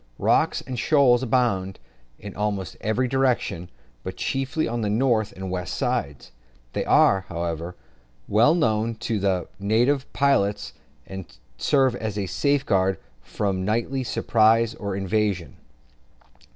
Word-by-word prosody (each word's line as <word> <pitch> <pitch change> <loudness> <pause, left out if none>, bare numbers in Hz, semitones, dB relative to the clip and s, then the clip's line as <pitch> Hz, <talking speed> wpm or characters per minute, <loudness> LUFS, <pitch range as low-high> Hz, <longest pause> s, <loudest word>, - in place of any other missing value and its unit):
Rocks - - +2
and 130 -2 -6
shoals 130 -4 +4
abound 110 -7 0 0.4
in 100 -1 -9
almost 100 -3 -3
every 110 +4 0
direction, 125 -9 0 0.3
but - - -7
chiefly 135 +4 -1
on 120 0 -2
the 105 - -1
north 110 -1 +1
and 95 0 -6
west 90 -2 -3
sides. 70 -4 -2 0.4
They - - -1
are, 95 -1 +4
however, 85 0 -4 0.5
well 115 +10 +4
known 115 -6 +1
to 115 -1 -2
the 95 -3 0
native 120 +7 +1
pilots, 135 -8 +1 0.3
and 95 -2 -8 0.3
serve 130 - +2
as 110 -3 -4
a 100 - -1
safeguard 95 -7 +1 0.2
from 95 +7 -2
nightly 120 +6 -1
surprise 115 -1 +2
or 100 -2 -5
invasion. 95 -4 -1
110 Hz, 125 wpm, -24 LUFS, 95-125 Hz, 0.5 s, shoals